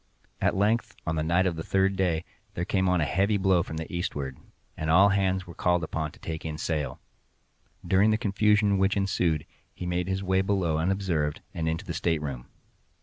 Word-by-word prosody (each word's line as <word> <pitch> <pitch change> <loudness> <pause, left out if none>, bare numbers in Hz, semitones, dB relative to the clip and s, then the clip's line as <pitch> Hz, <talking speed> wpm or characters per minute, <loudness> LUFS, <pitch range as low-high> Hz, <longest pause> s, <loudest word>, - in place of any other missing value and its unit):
At - - +2
length, 105 +4 +1
on 80 - -1
the 80 - 0
night 85 +4 +2
of 90 -3 0
the 80 - -5
third 95 +2 +1
day, 85 -4 0 0.3
there 85 - -2
came 95 -1 +1
on 90 -2 +2
a - - +2
heavy 100 +6 +2
blow 95 -2 +3
from 80 -2 -6
the 80 +2 -6
eastward, 70 -6 -3 0.4
and 80 - -3
all 95 +5 +6
hands 95 -2 +1
were 85 - -10
called 90 -1 +1
up 80 - -5 0.2
to - - -18
take 80 -1 -5
in 80 -1 -4
sail. 75 -3 -2 0.9
During 95 +4 +4
the 110 - +3
confusion 105 -2 +2
which 95 +1 +2
ensued, 90 -6 0 0.3
he 90 - -6
made 90 0 -1
his 95 +1 -2
way 95 0 +2
below 95 -5 0
unobserved, 85 -4 0
and 80 -1 -1
into 80 0 -3
the - - -4
stateroom. 75 -7 -2
90 Hz, 200 wpm, -27 LUFS, 80-95 Hz, 0.9 s, all